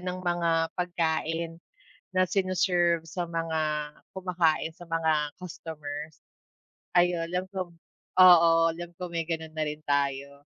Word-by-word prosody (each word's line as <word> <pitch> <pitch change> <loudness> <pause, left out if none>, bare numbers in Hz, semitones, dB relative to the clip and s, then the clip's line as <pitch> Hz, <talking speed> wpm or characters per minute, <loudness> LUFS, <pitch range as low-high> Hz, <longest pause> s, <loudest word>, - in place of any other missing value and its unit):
ng 180 0 -4
mga 175 -1 +1 0.2
pagkain 165 -1 -2 0.5
na 185 - +4
sine-serve 180 -3 +2
sa 175 +2 -4
mga 165 -1 -2 0.6
kumakain, 175 -4 +1
sa 175 +1 -13
mga 160 -3 0
customers, 155 -4 -8 0.8
ayu 175 -1 +4
'lam 180 +1 -1
ko 185 -2 -3 0.5
oo, 175 -2 +9 0.2
alam 175 +1 -7
ko 180 - -4
may 165 - 0
ganun 160 -1 -3
na 155 - -3
rin 150 +1 -8
tayo, 140 0 -1
165 Hz, 125 wpm, -28 LUFS, 160-180 Hz, 0.8 s, oo